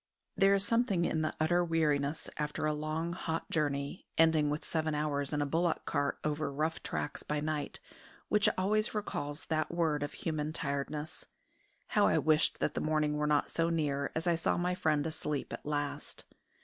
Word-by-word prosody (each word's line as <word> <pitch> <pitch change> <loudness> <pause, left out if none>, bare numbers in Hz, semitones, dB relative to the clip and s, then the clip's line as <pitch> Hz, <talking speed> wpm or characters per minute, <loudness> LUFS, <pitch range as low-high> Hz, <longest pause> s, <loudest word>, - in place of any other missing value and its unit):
There 195 0 +5
is 195 0 +1
something 230 -6 +2
in 160 - 0
the 155 - -1
utter 175 +3 +3
weariness 155 -3 +1
after 150 0 -2
a 155 - +2
long, 155 +3 -2
hot 165 -2 -3
journey, 145 0 -1
ending 160 -2 +5
with 150 +1 -2
seven 155 -2 0
hours 145 -2 -1
in 150 -1 +1
a - - -1
bullock 165 +4 0
cart 145 0 0
over 150 -1 -1
rough 155 +3 -1
tracks 150 - -3
by 150 0 -2
night, 150 -1 -3 0.5
which 210 -1 +4
always 215 +4 +1
recalls 145 -8 -3
that 155 -1 0
word 160 -4 +1
of 145 - -3
human 155 -1 -2
tiredness. 150 +1 -3 0.6
How - - +4
I - - +3
wished 155 0 +3
that - - +1
the - - -2
morning 155 -1 +1
were 150 0 +1
not 150 -1 +2
so 165 0 +1
near 145 -4 0
as 160 - -1
I 175 - +4
saw 165 0 +1
my 180 +1 +1
friend 155 -5 +1
asleep 150 -2 -3
at - - -7
last! 145 -1 -3
155 Hz, 185 wpm, -32 LUFS, 150-165 Hz, 0.6 s, There